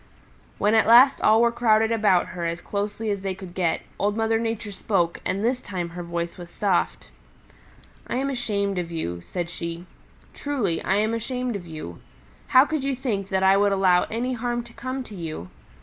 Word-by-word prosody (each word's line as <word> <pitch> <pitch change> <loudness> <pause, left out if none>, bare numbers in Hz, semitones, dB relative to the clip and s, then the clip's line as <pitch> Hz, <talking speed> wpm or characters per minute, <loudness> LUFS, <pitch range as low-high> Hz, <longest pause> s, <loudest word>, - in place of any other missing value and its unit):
When 210 +2 +2
at 220 -1 +4
last 250 +4 +7
all 220 +2 +5
were 235 - +4
crowded 225 -2 +3
about 210 -5 +3
her 175 -2 -5
as 170 +1 -3
closely 205 +3 -3
as 200 -1 -2
they 190 -1 -3
could 185 -2 -10
get, 175 -3 0 0.2
Old 205 +1 0
Mother 225 0 +1
Nature 225 -2 -3
spoke 190 -3 -1
and 200 +4 -1
this 250 +1 +1
time 180 -3 -4
her 175 +1 -7
voice 170 0 -4
was 175 -1 -9
soft. 175 - -1 1.0
"I - - -3
am 275 +2 0
ashamed 200 -6 -1
of 170 -1 -4
you," 85 - -4
said 175 - -4
she. 170 0 -6 0.5
"Truly 250 - -1
I 190 - +1
am 215 +2 +1
ashamed 250 +1 -2
of 180 -3 -6
you. 155 - -8 0.5
How 255 +2 +6
could 310 -2 -2
you 275 -1 0
think 210 -7 -3
that 190 -1 +1
I 190 +1 +6
would 205 0 +3
allow 185 -2 +4
any 245 +3 -2
harm 240 0 -2
to 235 0 -15
come 255 +3 -4
to 220 - -12
you? 160 - -6
205 Hz, 195 wpm, -24 LUFS, 175-235 Hz, 1.0 s, last